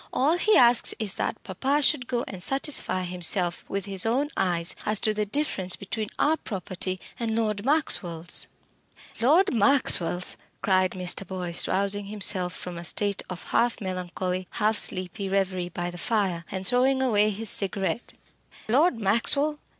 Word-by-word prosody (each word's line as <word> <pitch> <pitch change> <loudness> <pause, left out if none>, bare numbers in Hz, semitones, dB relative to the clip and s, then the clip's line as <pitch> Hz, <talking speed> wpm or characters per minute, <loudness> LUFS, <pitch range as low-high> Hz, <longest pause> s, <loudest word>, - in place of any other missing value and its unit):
All 300 +6 +2
he 430 +4 +3
asks 240 -1 +5
is 210 -4 -1
that - - -3
papa 270 +10 0
should 265 -4 +2
go 240 -1 -1
and 190 -3 -7
satisfy 270 - +1
himself 180 0 0
with 195 -1 -3
his 195 -2 +1
own 265 +7 0
eyes 170 -2 0
as 215 -1 +2
to 215 - +2
the 210 0 -2
difference 200 -8 -1
between 215 +2 -4
our 315 +2 +2
property 185 - -4 0.2
and 225 -2 -2
Lord 215 -3 -1
Maxwell's 180 - -1 0.3
" - - -19
"Lord 320 +10 +4
Maxwell's!" 205 -7 +2 0.3
cried 185 -1 +2
Mr. 185 +1 -1
Boyce, 180 -2 0
rousing 200 +1 -1
himself 195 -3 +1
from 180 -1 -8
a - - -8
state 200 +4 0
of 180 -1 -7
half 240 0 0
melancholy, 185 -1 -4
half 215 0 +1
sleepy 190 0 +1
reverie 190 -2 -1
by 175 0 -4
the 175 - -10
fire, 190 -7 -1
and 190 0 -5
throwing 255 +3 +4
away 215 -4 +3
his 215 +1 +1
cigarette 195 +3 -1 0.5
"Lord 260 +3 +3
Maxwell! 280 +9 +1
200 Hz, 160 wpm, -26 LUFS, 185-240 Hz, 0.5 s, asks